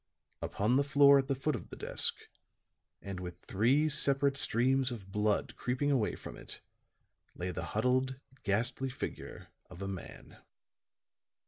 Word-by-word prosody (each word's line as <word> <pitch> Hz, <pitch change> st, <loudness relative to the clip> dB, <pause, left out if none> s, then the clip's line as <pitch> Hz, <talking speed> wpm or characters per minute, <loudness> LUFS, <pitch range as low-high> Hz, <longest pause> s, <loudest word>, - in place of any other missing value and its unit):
Upon 110 Hz, +6 st, +1 dB
the 140 Hz, -, +4 dB
floor 140 Hz, 0 st, +6 dB
at 135 Hz, -, -1 dB
the 135 Hz, -, +1 dB
foot 135 Hz, +2 st, -1 dB
of 95 Hz, -, -8 dB
the -, -, -8 dB
desk, -, -, -1 dB, 0.9 s
and 100 Hz, -2 st, -5 dB
with 90 Hz, -1 st, -6 dB
three 125 Hz, +13 st, +2 dB
separate 140 Hz, -2 st, +2 dB
streams 130 Hz, 0 st, +2 dB
of 100 Hz, -5 st, -7 dB
blood 105 Hz, +1 st, 0 dB
creeping 130 Hz, +4 st, 0 dB
away 120 Hz, -7 st, +1 dB
from -, -, -9 dB
it, -, -, -9 dB, 0.8 s
lay 90 Hz, +1 st, -3 dB
the 80 Hz, -, -4 dB, 0.2 s
huddled, 130 Hz, +3 st, +1 dB, 0.2 s
ghastly 120 Hz, +6 st, 0 dB
figure 130 Hz, -, -6 dB, 0.2 s
of 90 Hz, +1 st, -8 dB
a -, -, -3 dB
man. 95 Hz, -2 st, -8 dB
125 Hz, 145 wpm, -32 LUFS, 100-135 Hz, 0.9 s, floor